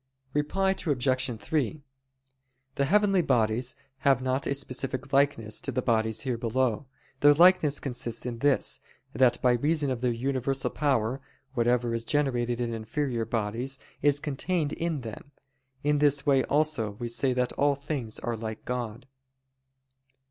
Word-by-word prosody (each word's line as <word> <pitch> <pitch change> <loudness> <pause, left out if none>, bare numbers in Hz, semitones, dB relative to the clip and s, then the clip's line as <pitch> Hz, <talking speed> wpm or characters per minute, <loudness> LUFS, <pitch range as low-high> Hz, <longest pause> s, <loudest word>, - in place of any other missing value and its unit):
Reply 190 +7 +1
Obj. 130 - 0
3: 150 +1 -2 0.9
The 140 - 0
heavenly 195 +2 +3
bodies 120 -3 +1 0.2
have 135 -1 +3
not 130 +1 -1
a 140 - 0
specific 135 0 -3
likeness 135 -6 +1
to - - -3
the 130 - -2
bodies 110 -2 +1
here 125 -2 -2
below. 125 +1 0 0.3
Their 145 +1 +6
likeness 165 -4 +5
consists 120 -3 -4
in 120 -2 -4
this, 140 +1 +2 0.3
that 125 -2 +3
by 125 - +5
reason 145 +3 +1
of 125 -2 -3
their 125 -1 +1
universal 130 +2 -1
power, 135 -3 0 0.3
whatever 120 -1 +1
is 115 0 -2
generated 120 -3 0
in 120 -1 -2
inferior 115 +2 -2
bodies, 115 +4 -2 0.2
is 145 0 +3
contained 150 +2 -1
in 165 -4 -2
them. 120 +5 -9 0.5
In 145 0 +2
this 145 -1 +3
way 135 -3 +4
also 145 -8 +1
we 120 +3 -5
say 130 +3 +1
that 125 0 0
all 145 0 +2
things 135 -5 -4
are 120 0 -3
like 110 -1 -6
God. 125 -1 -4
130 Hz, 150 wpm, -28 LUFS, 120-145 Hz, 0.9 s, Their